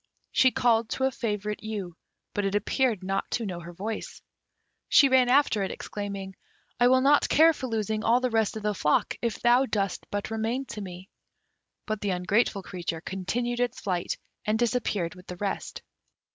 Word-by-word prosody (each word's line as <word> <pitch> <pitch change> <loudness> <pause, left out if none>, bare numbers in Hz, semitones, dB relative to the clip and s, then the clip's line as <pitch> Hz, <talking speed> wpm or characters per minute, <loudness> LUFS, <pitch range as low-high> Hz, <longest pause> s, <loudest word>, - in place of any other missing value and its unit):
She 260 - +5
called 230 -3 +2
to 265 - -2
a 265 - +3
favourite 210 -4 -3
ewe, 205 -6 -5 0.4
but 205 - -1
it 195 0 0
appeared 220 0 +1
not 195 +1 -2
to 235 - -1
know 180 -4 -4
her 170 0 -9
voice. 210 +5 -5 0.7
She 280 - +7
ran 260 -1 +4
after 260 -5 +4
it, 195 - -1
exclaiming, 200 -2 -6 0.4
"I 245 - +6
will 260 +1 +5
not 285 +2 +4
care 325 +2 +6
for 260 -3 -5
losing 220 -1 -1
all 235 +2 +4
the 255 -1 -1
rest 220 -1 +1
of 215 - -7
the 210 0 +1
flock 150 -6 +1
if 235 -3 -2
thou 245 +3 +4
dost 200 -5 -2
but 205 +2 -3
remain 225 +4 -1
to 210 - -6
me!" 185 -1 -8 0.8
But 215 -2 -3
the 205 - -1
ungrateful 195 +3 +1
creature 170 -4 -4
continued 240 +7 -2
its 245 0 -1
flight, 180 -3 -2 0.3
and 215 +1 +1
disappeared 220 -7 0
with 180 0 -15
the 180 - -7
rest. 200 +1 -4
215 Hz, 185 wpm, -27 LUFS, 195-245 Hz, 0.8 s, She